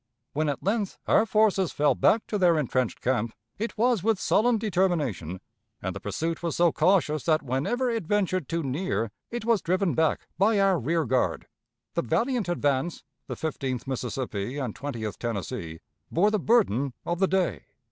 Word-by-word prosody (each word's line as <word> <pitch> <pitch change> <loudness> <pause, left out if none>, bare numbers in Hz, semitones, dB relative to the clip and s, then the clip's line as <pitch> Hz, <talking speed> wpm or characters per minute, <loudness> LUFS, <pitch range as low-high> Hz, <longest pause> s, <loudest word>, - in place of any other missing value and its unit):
When 155 +1 0
at 140 - -3
length 200 0 -1
our 220 - +4
forces 205 -4 +3
fell 145 0 +3
back 220 - +3
to 210 - -2
their 175 -3 +4
intrenched 130 -4 -1
camp, 120 -3 0 0.2
it 225 +1 -3
was 235 -2 +2
with 220 0 +1
sullen 230 +4 +3
determination, 165 - -1 0.4
and - - -4
the - - -4
pursuit 165 0 -3
was 170 -2 -2
so 170 -1 +4
cautious 155 -7 +2
that 155 -2 +2
whenever 145 - -1
it 230 -8 -2
ventured 185 -5 0
too 165 0 -1
near 135 - -1 0.2
it 235 -1 -5
was 230 -4 +3
driven 185 -1 +1
back 160 +3 +1
by 205 +1 +4
our 195 -3 +3
rear 160 +5 0
guard. 130 +1 0 0.5
The - - +1
valiant 230 - 0
advance 145 -1 0 0.2
the - - -4
Fifteenth 135 -6 -3
Mississippi 125 -2 -3
and 130 -6 -3
Twentieth 120 -5 -5
Tennessee 100 -7 -4 0.3
bore 200 +6 +3
the 215 - +1
burden 140 - +2
of 175 0 -2
the 190 - +4
day. 175 - 0
165 Hz, 170 wpm, -27 LUFS, 130-200 Hz, 0.5 s, our